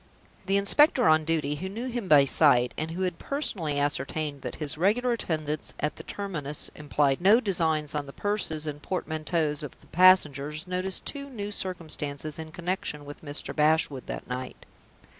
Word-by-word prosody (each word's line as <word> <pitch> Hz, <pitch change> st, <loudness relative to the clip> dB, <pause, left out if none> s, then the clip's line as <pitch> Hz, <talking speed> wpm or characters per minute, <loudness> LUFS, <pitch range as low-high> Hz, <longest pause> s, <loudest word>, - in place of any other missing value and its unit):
The 195 Hz, +1 st, +3 dB
inspector 245 Hz, +6 st, +4 dB
on 155 Hz, 0 st, +4 dB
duty, 150 Hz, -3 st, 0 dB
who 190 Hz, +5 st, -5 dB
knew 225 Hz, +6 st, -5 dB
him 240 Hz, -5 st, -4 dB
by 145 Hz, -4 st, +7 dB
sight, 130 Hz, -4 st, +4 dB
and 155 Hz, +1 st, -3 dB
who 175 Hz, +3 st, -3 dB
had 180 Hz, -2 st, -2 dB
personally 180 Hz, -, -2 dB
ascertained 145 Hz, 0 st, -2 dB
that -, -, -5 dB
his 150 Hz, -1 st, -3 dB
regular 215 Hz, +9 st, +2 dB
attendance 155 Hz, -9 st, -2 dB
at 150 Hz, -, -2 dB
the -, -, -7 dB
terminus 150 Hz, -8 st, -2 dB
implied 145 Hz, -1 st, 0 dB
no 205 Hz, +6 st, +6 dB
designs 160 Hz, -, 0 dB
on 145 Hz, -2 st, -3 dB
the -, -, -8 dB
purses 180 Hz, -5 st, -2 dB
and 150 Hz, -1 st, -5 dB
portmanteaus 155 Hz, -3 st, -1 dB
of 150 Hz, -, -8 dB
the -, -, -21 dB
passengers, 155 Hz, -5 st, +4 dB
noticed 185 Hz, +1 st, -2 dB
two 280 Hz, -1 st, -3 dB
new 205 Hz, -5 st, -5 dB
circumstances 155 Hz, -6 st, -2 dB
in 160 Hz, 0 st, -7 dB
connection 175 Hz, -4 st, -3 dB
with 145 Hz, +2 st, -10 dB
Mr. 145 Hz, 0 st, -5 dB
Bashwood 150 Hz, -3 st, +2 dB
that -, -, -6 dB
night. 125 Hz, 0 st, -6 dB
155 Hz, 170 wpm, -27 LUFS, 145-190 Hz, -, by